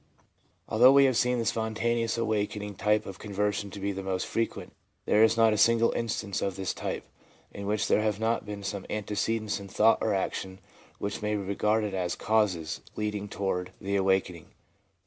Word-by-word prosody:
Although 125 Hz, +5 st, +6 dB
we 140 Hz, 0 st, +7 dB
have 130 Hz, -2 st, +2 dB
seen 125 Hz, +1 st, +2 dB
the 115 Hz, -, -1 dB
spontaneous 115 Hz, +1 st, 0 dB
awakening 105 Hz, -2 st, -1 dB
type 105 Hz, +3 st, +1 dB
of 95 Hz, -1 st, -8 dB
conversion 105 Hz, 0 st, -2 dB
to 100 Hz, -, -8 dB
be 100 Hz, +1 st, -1 dB
the 95 Hz, 0 st, -5 dB
most 95 Hz, -1 st, -2 dB
frequent, 115 Hz, 0 st, -3 dB, 0.3 s
there 105 Hz, -, +4 dB
is 110 Hz, +1 st, +4 dB
not 115 Hz, -1 st, +5 dB
a 105 Hz, -, 0 dB
single 115 Hz, +1 st, +4 dB
instance 110 Hz, -3 st, -2 dB
of 100 Hz, -2 st, -1 dB
this 95 Hz, -1 st, -2 dB
type -, -, -4 dB, 0.5 s
in 100 Hz, 0 st, -7 dB
which 105 Hz, -1 st, 0 dB
there -, -, +3 dB
have 105 Hz, -1 st, 0 dB
not 115 Hz, +1 st, 0 dB
been 105 Hz, -1 st, -7 dB
some 95 Hz, 0 st, -4 dB
antecedents 105 Hz, +1 st, -1 dB
in 100 Hz, -, -9 dB
thought 110 Hz, +3 st, +4 dB
or 110 Hz, -2 st, +1 dB
action 95 Hz, 0 st, -3 dB, 0.4 s
which 100 Hz, +1 st, -4 dB
may 105 Hz, 0 st, 0 dB
be 100 Hz, -, -2 dB
re 100 Hz, +1 st, -3 dB
garded 105 Hz, 0 st, +1 dB
as 90 Hz, -2 st, -2 dB
l -, -, -11 dB
causes 100 Hz, -8 st, +1 dB
' -, -, -21 dB
leading 105 Hz, -1 st, -3 dB
toward 95 Hz, -3 st, -2 dB
the 100 Hz, +1 st, -2 dB
awakening. 95 Hz, -3 st, 0 dB
105 Hz, 195 wpm, -28 LUFS, 100-110 Hz, 0.5 s, we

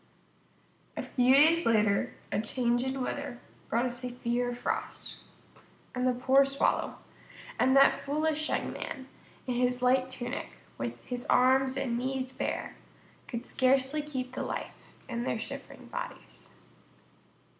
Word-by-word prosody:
A -, -, -2 dB
few 250 Hz, 0 st, +2 dB
days 325 Hz, +4 st, +6 dB
later 215 Hz, -3 st, +2 dB, 0.2 s
a 205 Hz, -, +1 dB
change 240 Hz, +2 st, 0 dB
in 265 Hz, 0 st, -2 dB
weather 280 Hz, -2 st, -4 dB, 0.3 s
brought 235 Hz, +3 st, +2 dB
a 250 Hz, -, -1 dB
severe 245 Hz, 0 st, -2 dB
frost; 245 Hz, -, -3 dB, 0.7 s
and 250 Hz, 0 st, 0 dB
the -, -, +4 dB
poor 260 Hz, +3 st, +5 dB
swallow 275 Hz, 0 st, +1 dB, 0.6 s
and 260 Hz, +2 st, +5 dB
that 275 Hz, -, +8 dB
foolish 310 Hz, +2 st, -1 dB
young -, -, -1 dB
man 260 Hz, -1 st, -6 dB, 0.4 s
in 255 Hz, -, -1 dB
his 250 Hz, +1 st, +1 dB
light 255 Hz, +1 st, +3 dB
tunic, 245 Hz, -1 st, -4 dB
and -, -, -25 dB
with 120 Hz, 0 st, -19 dB
his 245 Hz, 0 st, -5 dB
arms 260 Hz, +1 st, +4 dB
and 235 Hz, -2 st, 0 dB
knees 260 Hz, 0 st, -2 dB
bare, -, -, -3 dB, 0.5 s
could 235 Hz, 0 st, -5 dB
scarcely 265 Hz, +4 st, +3 dB
keep 260 Hz, -4 st, -5 dB
life -, -, -3 dB, 0.3 s
in 235 Hz, -1 st, -3 dB
their 235 Hz, -, -1 dB
shivering -, -, -8 dB
bodies. -, -, -7 dB
255 Hz, 135 wpm, -30 LUFS, 245-270 Hz, 0.7 s, that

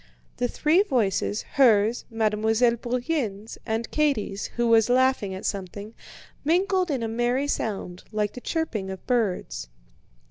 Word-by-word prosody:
The 245 Hz, -, +1 dB
three 305 Hz, +8 st, +3 dB
voices, 220 Hz, -, 0 dB
hers, 230 Hz, -5 st, +3 dB
Mademoiselle 225 Hz, +1 st, +2 dB
Bourienne's, 240 Hz, -4 st, -3 dB
and 225 Hz, +1 st, -2 dB
Katie's, 265 Hz, -10 st, 0 dB
who 240 Hz, 0 st, +1 dB
was 225 Hz, 0 st, +5 dB
laughing 255 Hz, -6 st, +2 dB
at 190 Hz, -, -7 dB
something, 200 Hz, +2 st, -4 dB, 0.5 s
mingled 365 Hz, +3 st, +2 dB
in 265 Hz, -5 st, -1 dB
a -, -, -1 dB
merry 240 Hz, +5 st, 0 dB
sound, 195 Hz, -8 st, -3 dB
like 210 Hz, -1 st, -1 dB
the 250 Hz, -, -8 dB
chirping 240 Hz, -, -2 dB
of 190 Hz, -1 st, -8 dB
birds. 195 Hz, -, -1 dB
230 Hz, 135 wpm, -25 LUFS, 210-260 Hz, 0.5 s, was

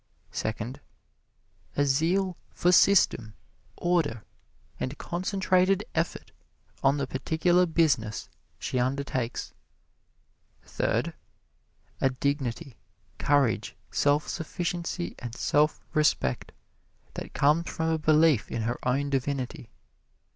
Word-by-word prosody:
Second, 110 Hz, +4 st, -4 dB, 1.0 s
A 145 Hz, -, +3 dB
zeal 175 Hz, +7 st, +1 dB
for 175 Hz, -, +2 dB
system, 145 Hz, -, +4 dB, 0.4 s
order 165 Hz, -11 st, 0 dB, 0.6 s
and 130 Hz, +3 st, -3 dB
concentrated 185 Hz, +1 st, +1 dB
effort 165 Hz, +1 st, -2 dB, 0.5 s
on 135 Hz, +1 st, +3 dB
the 140 Hz, -, -1 dB
particular 165 Hz, +7 st, +2 dB
business 140 Hz, -10 st, +1 dB, 0.3 s
she 130 Hz, -, -2 dB
undertakes. 130 Hz, -, -2 dB, 1.1 s
Third, -, -, -1 dB, 0.9 s
A 135 Hz, -, +4 dB
dignity, 135 Hz, 0 st, -2 dB, 0.4 s
courage, 140 Hz, -6 st, +2 dB, 0.2 s
self 145 Hz, +1 st, +2 dB
sufficiency 175 Hz, +1 st, -3 dB
and 120 Hz, -2 st, -7 dB
self 150 Hz, +3 st, +2 dB
respect 150 Hz, -, +1 dB, 0.6 s
that -, -, -7 dB
comes 150 Hz, +4 st, +3 dB
from 160 Hz, 0 st, -1 dB
a 160 Hz, -1 st, +1 dB
belief 155 Hz, -4 st, +4 dB
in 115 Hz, -, -2 dB
her 120 Hz, +2 st, -2 dB
own 140 Hz, +3 st, 0 dB
divinity. 135 Hz, -1 st, -2 dB
145 Hz, 95 wpm, -28 LUFS, 130-170 Hz, 1.1 s, system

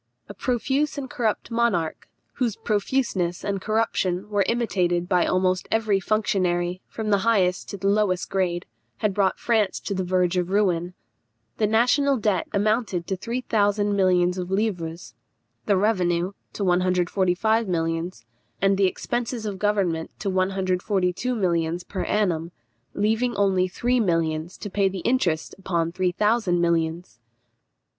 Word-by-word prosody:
A -, -, -8 dB
profuse 265 Hz, +7 st, -1 dB
and 275 Hz, -2 st, -4 dB
corrupt 235 Hz, -2 st, -2 dB
monarch, 230 Hz, -9 st, 0 dB, 0.3 s
whose 240 Hz, -6 st, 0 dB
profuseness 205 Hz, -5 st, -1 dB
and 195 Hz, -1 st, -2 dB
corruption 210 Hz, -3 st, 0 dB
were 205 Hz, -1 st, +3 dB
imitated 180 Hz, -7 st, 0 dB
by 180 Hz, -2 st, +2 dB
almost 185 Hz, 0 st, +1 dB
every 220 Hz, -3 st, +2 dB
functionary, 185 Hz, -4 st, 0 dB
from 215 Hz, -1 st, -4 dB
the 200 Hz, -, +4 dB
highest 190 Hz, -4 st, +1 dB
to 200 Hz, -, -5 dB
the 195 Hz, +1 st, -2 dB
lowest 200 Hz, -3 st, +1 dB
grade, 175 Hz, -2 st, -1 dB, 0.3 s
had 210 Hz, -2 st, 0 dB
brought 195 Hz, -1 st, +1 dB
France 220 Hz, -4 st, +1 dB
to 200 Hz, -, -3 dB
the 190 Hz, -1 st, -1 dB
verge 180 Hz, 0 st, +1 dB
of 180 Hz, 0 st, 0 dB
ruin. 180 Hz, -3 st, +1 dB, 0.6 s
The 210 Hz, -, +2 dB
national 250 Hz, +6 st, +3 dB
debt 210 Hz, -6 st, 0 dB
amounted 210 Hz, -3 st, 0 dB
to 190 Hz, -, -2 dB
3000 205 Hz, -2 st, 0 dB
millions 180 Hz, -1 st, +2 dB
of 180 Hz, 0 st, -4 dB
livres, 180 Hz, -5 st, -2 dB, 0.5 s
the 200 Hz, -2 st, +3 dB
revenue 185 Hz, -3 st, +1 dB, 0.2 s
to 205 Hz, -, -3 dB
145 185 Hz, +4 st, +2 dB
millions, 165 Hz, -6 st, -2 dB, 0.3 s
and 195 Hz, 0 st, +2 dB
the 195 Hz, -, +5 dB
expenses 240 Hz, +3 st, -3 dB
of 200 Hz, -3 st, -4 dB
government 190 Hz, -6 st, 0 dB
to 195 Hz, -, -1 dB
142 190 Hz, +3 st, 0 dB
millions 170 Hz, -4 st, 0 dB
per 185 Hz, -, -5 dB
annum; 170 Hz, -5 st, 0 dB, 0.4 s
leaving 225 Hz, +4 st, +1 dB
only 190 Hz, -2 st, +2 dB
three 245 Hz, +7 st, 0 dB
millions 165 Hz, -3 st, 0 dB
to 205 Hz, -, -6 dB
pay 195 Hz, -1 st, +2 dB
the 190 Hz, -1 st, -5 dB
interest 175 Hz, -9 st, 0 dB
upon 170 Hz, -3 st, -1 dB
3000 185 Hz, +1 st, +1 dB
millions. 170 Hz, -4 st, -1 dB
190 Hz, 140 wpm, -24 LUFS, 180-215 Hz, 0.6 s, the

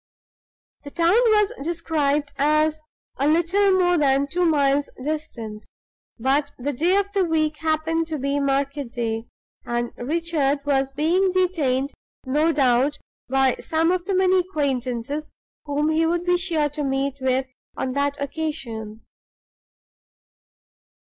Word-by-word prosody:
The 285 Hz, -, -8 dB
town 335 Hz, +4 st, +2 dB
was 435 Hz, -2 st, +4 dB
described 300 Hz, -3 st, -1 dB
as 305 Hz, +2 st, +2 dB, 0.4 s
little 340 Hz, +7 st, +3 dB
more 355 Hz, -2 st, +3 dB
than 275 Hz, -1 st, +3 dB
two 350 Hz, +5 st, 0 dB
miles 285 Hz, -3 st, +2 dB
distant; 240 Hz, -8 st, -5 dB, 0.5 s
but 275 Hz, +4 st, +1 dB
the 285 Hz, +4 st, -3 dB
day 340 Hz, +9 st, +2 dB
of 400 Hz, 0 st, 0 dB
the 395 Hz, -2 st, +2 dB
week 310 Hz, -2 st, 0 dB
happened 320 Hz, +1 st, 0 dB
to 315 Hz, -2 st, -3 dB
be 280 Hz, +1 st, -1 dB
market 275 Hz, -2 st, -1 dB
day, 225 Hz, -2 st, -3 dB, 0.4 s
and 240 Hz, 0 st, -2 dB
Richard 295 Hz, 0 st, -1 dB
was 270 Hz, -2 st, +1 dB
being 335 Hz, +7 st, +1 dB
detained 300 Hz, -8 st, 0 dB, 0.3 s
no 300 Hz, +5 st, +2 dB
doubt 275 Hz, 0 st, +2 dB, 0.3 s
by 265 Hz, -1 st, +2 dB
some 325 Hz, +1 st, +1 dB
of 365 Hz, -1 st, -1 dB
the 390 Hz, -, -1 dB
many 375 Hz, 0 st, +4 dB
acquaintances 280 Hz, -4 st, -2 dB, 0.3 s
whom 295 Hz, +1 st, 0 dB
he 320 Hz, +1 st, +2 dB
would 345 Hz, +1 st, -1 dB
be 355 Hz, 0 st, +2 dB
sure 330 Hz, -5 st, 0 dB
to 295 Hz, +1 st, -4 dB
meet 275 Hz, 0 st, -1 dB
with 260 Hz, 0 st, +1 dB, 0.3 s
on 260 Hz, -, -2 dB
that 285 Hz, +1 st, -1 dB
occasion. 260 Hz, -8 st, -5 dB
295 Hz, 130 wpm, -23 LUFS, 270-335 Hz, 0.5 s, was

